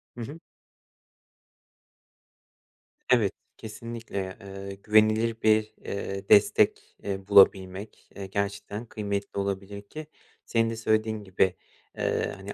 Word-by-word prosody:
Hı 120 - -7
hı. 145 +8 -7 2.7
Evet, 110 -6 +4 0.2
kesinlikle, 110 -4 -6
eee, 100 0 -8
güvenilir 110 +1 +3
bir, 110 0 +3
eee, 100 0 -5
destek, 100 - +4
eee, 95 -1 -4
bulabilmek, 95 0 +4
eee, 100 - -6
gerçekten 100 +3 -3
kıymetli 100 -2 -4
olabilir 100 0 -3
ki 150 +9 -9 0.4
senin 115 -1 +1
de 115 - -3
söylediğin 110 -1 0
gibi, 95 -1 +1 0.4
eee, - - -1
hani, 95 +1 -8
100 Hz, 105 wpm, -27 LUFS, 100-110 Hz, 2.7 s, Evet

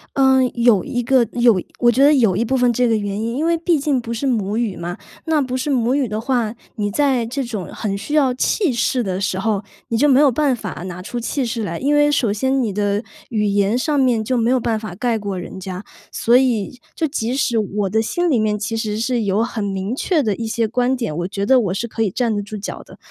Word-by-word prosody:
呃， 265 -1 +4
有 235 -6 +4
一 245 0 -2
个， 250 -1 +3
有 235 -6 +4 0.2
我 240 -1 +5
觉 260 +4 +3
得 290 +2 +6
有 225 -10 +3
一 215 - +1
部 265 +3 0
分 245 -1 +3
这 245 +1 +2
个 225 - +2
原 205 -1 -3
因。 230 +2 -2
因 310 - 0
为 335 0 +3
毕 330 -1 +1
竟 275 -3 0
不 235 0 -5
是 235 +4 -3
母 215 -5 0
语 225 -5 -1
嘛， 175 +1 -5 0.3
那 320 -2 +2
不 255 -2 -3
是 260 +3 -2
母 250 -3 +1
语 280 -3 +1
的 215 0 -3
话， 235 -2 -1 0.2
你 205 -3 -1
在 260 +1 +1
这 260 +4 -3
种 220 -7 -5
很 205 -3 -3
需 225 +9 -4
要 270 -4 +3
气 300 - +1
势 245 +1 0
的 190 -2 -3
时 190 - -1
候， 205 0 -1 0.3
你 230 - 0
就 290 - +4
没 270 -2 +5
有 290 -2 +5
办 280 0 +1
法 210 -6 -7
拿 180 0 -7
出 240 +6 -5
气 255 +3 -2
势 230 -1 -3
来。 170 -5 -3
因 285 +2 +1
为 295 0 +4
首 235 -8 +1
先 265 +5 0
你 220 -5 -1
的 205 +1 0 0.3
语 215 -3 0
言 200 +2 +2
上 295 +3 0
面 245 -4 +2
就 255 +4 -1
没 230 0 +1
有 255 0 +3
办 225 -2 -1
法 215 -5 -7
盖 230 +3 0
过 200 -3 -4
人 180 - -8
家。 185 +1 -6 0.3
所 235 - +2
以， 250 -2 +1 0.2
就 320 - 0
即 250 -4 -2
使 245 -4 +1
我 205 -2 -1
的 220 +4 +1
心 350 +10 -1
里 260 -7 +2
面 215 -1 +1
其 215 +2 -3
实 215 -1 -2
是 240 0 0
有 200 +2 +1
很 230 -2 -3
明 195 +3 -3
确 320 +3 +1
的 210 -4 0
一 225 - -4
些 225 0 0
观 245 +3 +1
点， 230 -11 -3
我 175 +2 -2
觉 200 +1 -3
得 260 +4 +5
我 195 -6 -1
是 235 +5 -3
可 225 - -5
以 210 - +1
站 230 +2 -1
得 205 - -1
住 205 +1 -7
脚 200 - -6
的。 - - -16
230 Hz, 280 characters per minute, -20 LUFS, 205-260 Hz, 0.3 s, 得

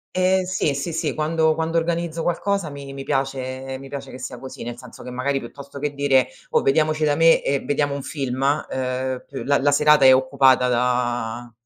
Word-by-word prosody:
Eh, 185 0 +2
sì, 180 -6 0
sì, 155 +4 -3
sì. 160 -2 -1
Quando 160 +1 +1
quando 165 +1 -1
organizzo 165 0 -1
qualcosa 185 0 -1
mi 140 -1 -9
mi 135 0 -6
piace 135 -1 -3
mi 135 - -10
piace 140 -1 -7
che - - -9
sia 125 -1 -7
così, 130 0 -9
nel 120 0 -6
senso 125 -1 -12
che 125 - -8
magari 135 +2 -1
piuttosto 140 +3 -10
che 145 0 -2
dire: 135 -2 +2 0.2
"Oh, - - +3
vediamoci 155 +2 +2
da 145 -1 +3
me 165 +1 +5
e 140 0 +1
vediamo 145 0 -1
un 140 - -4
film" 135 -3 -4
uhm, 130 -2 -1
p 135 - -7
la 140 +1 +3
la 145 +1 +2
serata 150 -1 +5
è 130 0 +9
occupata 130 -1 +3
da 120 -1 -1
140 Hz, 200 wpm, -22 LUFS, 130-155 Hz, 0.2 s, è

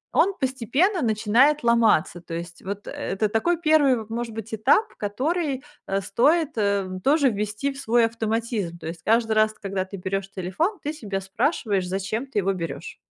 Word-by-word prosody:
он 395 - +4
постепенно 265 - +1
начинает 235 +6 +3
ломаться. 230 -8 +3
То 165 - -9
есть 170 0 -7
вот, 200 +1 -6
э, - - -5
это 210 +2 -2
такой 320 +11 +1
1, 285 -8 +3
может 230 0 -4
быть, 225 0 -7
этап, 265 - +2
который, 270 - -1 0.2
э, 195 0 0
стоит 300 - +2 0.5
тоже 285 -1 +4
ввести 210 +5 -2
в 275 - -10
свой 235 -2 +3
автоматизм. 225 -5 -2
То - - -10
есть 165 0 -6
каждый 225 0 +2
раз, 215 0 +3
когда 195 -3 -3
ты 195 +1 -8
берёшь 195 +1 -3
телефон, 200 - -2
ты 300 - -2
себя 205 -10 -4
спрашиваешь, 205 - 0
зачем 195 +6 -2
ты 260 -6 -1
его 195 0 +1
берёшь. 170 -3 -6
225 Hz, 170 wpm, -24 LUFS, 195-275 Hz, 0.5 s, он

